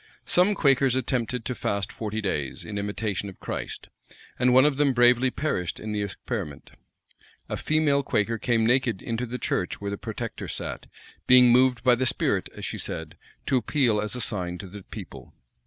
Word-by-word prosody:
Some 185 +4 +3
Quakers 135 -4 +3
attempted 125 -2 -1
to 125 - -1
fast 100 -3 -2
forty 110 0 -4
days, 75 -10 -3
in 105 -1 -4
imitation 100 -1 -2
of 95 - -13
Christ; - - -5 0.5
and 125 0 +4
one 130 +2 +7
of 145 -2 +2
them 140 -2 +3
bravely 120 +1 +5
perished 125 - -2
in 110 - -5
the 105 -1 -1
experiment.[*] 100 - -5 0.8
A - - -3
female 155 -2 +2
Quaker 115 -3 0
came 115 -1 +1
naked 120 -4 +1
into 120 +1 -2
the 125 +2 -4
church 90 -6 -2
where 100 0 -4
the 100 - -4
protector - - -5
sat; - - -5 0.4
being 125 -1 +8
moved 125 -1 +4
by 125 -1 +6
the 130 +2 +1
spirit, - - 0
as - - -6
she - - -4
said, 80 -1 -5 0.3
to 135 - +2
appeal 120 -3 +1
as 105 +3 -4
a 125 - -3
sign 90 -6 -3
to 95 - -8
the 100 +2 -10
people. - - -10
120 Hz, 185 wpm, -26 LUFS, 100-130 Hz, 0.8 s, being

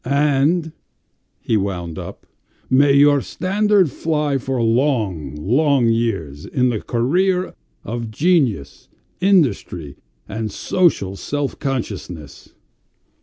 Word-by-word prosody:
"And," 145 +4 +1 0.7
he 110 - +1
wound 90 -5 -3
up, - - -9 0.5
"may 140 +2 +5
your 145 0 +5
standard 195 -1 +1
fly 150 -3 -1
for 130 0 -3
long, 115 - 0
long 125 - +2
years 95 -12 -1
in 125 -1 +1
the 110 -4 -2
career 180 +10 0 0.3
of 115 +1 -5
genius, 130 - 0 0.3
industry, 130 - +1 0.3
and 110 0 -4
social 130 - +1
self 145 +6 -3
consciousness." 95 - -5
130 Hz, 100 wpm, -20 LUFS, 100-150 Hz, 0.7 s, may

